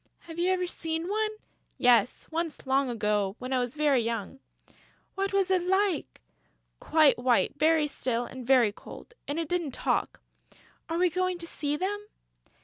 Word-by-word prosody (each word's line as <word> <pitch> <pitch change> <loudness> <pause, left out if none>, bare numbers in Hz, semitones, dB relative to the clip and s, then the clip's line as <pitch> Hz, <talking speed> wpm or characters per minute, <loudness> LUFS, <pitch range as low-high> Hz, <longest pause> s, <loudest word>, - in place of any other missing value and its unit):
"Have 330 0 -9
you 355 +2 +2
ever 370 -1 +1
seen 325 -1 -3
one?" 430 +2 0 0.5
"Yes, 245 -2 +3
once, 330 -2 -3
long 270 0 +2
ago, 210 -4 0
when 255 +1 -5
I 255 - +2
was 245 +1 -2
very 295 -4 +3
young...." 230 +2 -4 0.7
"What 390 0 -2
was 390 -1 +1
it 370 -1 +3
like?" 380 -1 0 0.6
"Quite 310 -5 +4
white, 245 -1 +2
very 315 0 +4
still 245 -4 -2
and 260 0 -8
very 245 -4 +4
cold; 345 - -12
and 285 - -3
it 330 -1 -2
didn't 335 -5 -2
talk...." - - -1 0.7
"Are 330 - -1
we 360 0 +3
going 365 +1 0
to 340 - -5
see 295 -3 -2
them?" 410 +4 -3
310 Hz, 165 wpm, -28 LUFS, 250-360 Hz, 0.7 s, Quite